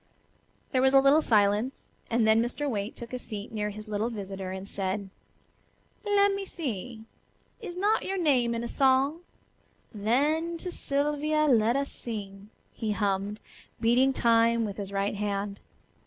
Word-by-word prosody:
There 255 Hz, -, +2 dB
was 265 Hz, +1 st, +4 dB
a -, -, +9 dB
little 275 Hz, +3 st, +5 dB
silence, 210 Hz, +2 st, +1 dB, 0.2 s
and 230 Hz, -1 st, +2 dB
then 220 Hz, +1 st, +5 dB
Mr. 245 Hz, +5 st, -2 dB
Waite 210 Hz, -5 st, -3 dB
took 235 Hz, +1 st, -9 dB
a 250 Hz, -, -3 dB
seat 210 Hz, -3 st, -7 dB
near 210 Hz, -1 st, -2 dB
his 215 Hz, +1 st, -9 dB
little 215 Hz, +2 st, -1 dB
visitor 195 Hz, -4 st, -6 dB
and 190 Hz, +1 st, -6 dB
said: 195 Hz, 0 st, -3 dB, 0.9 s
"Let 405 Hz, -1 st, +3 dB
me 395 Hz, 0 st, -3 dB
see; 240 Hz, -, -5 dB, 0.5 s
is 370 Hz, -6 st, -7 dB
not 415 Hz, +4 st, +2 dB
your 390 Hz, -, -2 dB
name 255 Hz, -9 st, +2 dB
in 230 Hz, -, -3 dB
a -, -, -3 dB
song? 270 Hz, +5 st, +2 dB, 0.7 s
'Then 295 Hz, +11 st, +1 dB
to 360 Hz, +2 st, -6 dB
Sylvia 295 Hz, +1 st, 0 dB
let 235 Hz, -4 st, +3 dB
us 275 Hz, 0 st, -1 dB
sing,'" 200 Hz, -3 st, -7 dB, 0.2 s
he 220 Hz, -3 st, -2 dB
hummed, 205 Hz, 0 st, -1 dB, 0.4 s
beating 245 Hz, +4 st, +4 dB
time 230 Hz, -2 st, +3 dB
with 200 Hz, -1 st, -5 dB
his 200 Hz, -2 st, -5 dB
right 200 Hz, +1 st, -1 dB
hand. 200 Hz, -1 st, -2 dB
230 Hz, 155 wpm, -28 LUFS, 205-280 Hz, 0.9 s, a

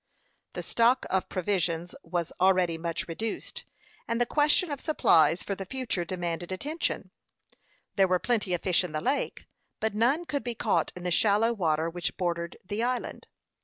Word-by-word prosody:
The -, -, -5 dB
stock 240 Hz, +3 st, +3 dB
of 190 Hz, -1 st, 0 dB
provisions 180 Hz, -2 st, -1 dB
was 170 Hz, -1 st, -3 dB
already 185 Hz, -3 st, +4 dB
much 165 Hz, 0 st, -3 dB
reduced, 215 Hz, +7 st, -5 dB, 0.4 s
and 230 Hz, 0 st, 0 dB
the 240 Hz, -, +3 dB
question 300 Hz, +5 st, +2 dB
of 285 Hz, -, -4 dB
supplies 165 Hz, -, +4 dB
for 200 Hz, -, -2 dB
the 195 Hz, -, -5 dB
future 235 Hz, -4 st, -2 dB
demanded 175 Hz, 0 st, -3 dB
attention. 295 Hz, -, -3 dB, 0.9 s
There 195 Hz, -1 st, +5 dB
were 180 Hz, 0 st, +3 dB
plenty 210 Hz, -3 st, 0 dB
of 175 Hz, -, -6 dB
fish 185 Hz, -1 st, +3 dB
in 175 Hz, -4 st, -5 dB
the 155 Hz, -, 0 dB
lake, 275 Hz, +3 st, -1 dB, 0.3 s
but 220 Hz, -1 st, 0 dB
none 250 Hz, +11 st, +2 dB
could 285 Hz, -4 st, -2 dB
be 240 Hz, -1 st, -3 dB
caught -, -, +1 dB
in 180 Hz, -, -8 dB
the 180 Hz, -, -1 dB
shallow 215 Hz, +5 st, +3 dB
water 160 Hz, -6 st, +1 dB
which 165 Hz, -5 st, -3 dB
bordered 170 Hz, -2 st, -2 dB
the 205 Hz, +4 st, -3 dB
island. 250 Hz, +1 st, -2 dB
190 Hz, 170 wpm, -28 LUFS, 175-235 Hz, 0.9 s, There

